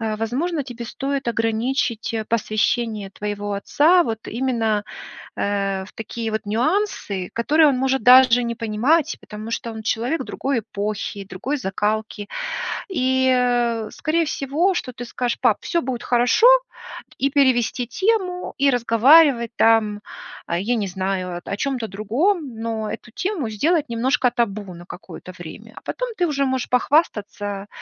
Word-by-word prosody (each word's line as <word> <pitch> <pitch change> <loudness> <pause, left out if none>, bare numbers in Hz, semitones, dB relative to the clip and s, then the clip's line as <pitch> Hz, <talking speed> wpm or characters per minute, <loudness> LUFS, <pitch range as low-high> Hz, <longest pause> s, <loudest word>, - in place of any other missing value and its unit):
а, 220 -1 -2
возможно, 275 +8 -2
тебе 245 -2 -7
стоит 270 +1 -3
ограничить, 230 +1 -1
а, 220 -1 -2
посвящение 215 -2 0
твоего 205 0 -4
отца 320 - +4
вот 225 -6 -4
именно, 225 -4 0 0.5
а, 195 -1 -1
в - - -16
такие 225 +1 -5
вот 220 - -1
нюансы, 235 - -1
которые 300 +6 +4
он 260 - 0
может 265 +1 0
даже 250 -1 +7
не 235 0 -2
понимать, 245 +8 +1
потому 215 +1 -8
что 230 0 -3
он 220 0 -7
человек 245 +7 -1
другой 270 -1 -2
эпохи, 205 -1 -4
другой 255 +11 -3
закалки. 210 0 -2 0.6
И, 260 -6 +2
э, 240 -3 +1
скорее 325 +2 0
всего, 305 +6 0
что 255 -7 -4
ты 245 0 -7
скажешь: 245 0 -2
"Пап, - - +3
всё 340 - 0
будет 245 -2 -4
хорошо". 245 - +4 0.7
И 275 - +1
перевести 255 -3 +2
тему, 375 - -1
и 280 0 +4
разговаривать 245 +1 +5
там, 215 -2 +3 0.5
а, 170 - -1
я 235 +6 0
не 210 -4 -1
знаю, 185 -1 -3
о 200 - -4
чём-то 255 -4 -2
другом, 255 - -1
но 225 -1 -3
эту 240 - -8
тему 345 - -2
сделать 300 - +1
немножко 250 +1 +1
табу 205 -5 -2
на 175 +1 -12
какое-то 185 0 -10
время. 210 +7 -10
А - - -10
потом - - -4
ты 360 - +2
уже 280 -2 0
можешь 260 -1 -1
похвастаться 210 - 0
235 Hz, 150 wpm, -22 LUFS, 215-275 Hz, 0.7 s, даже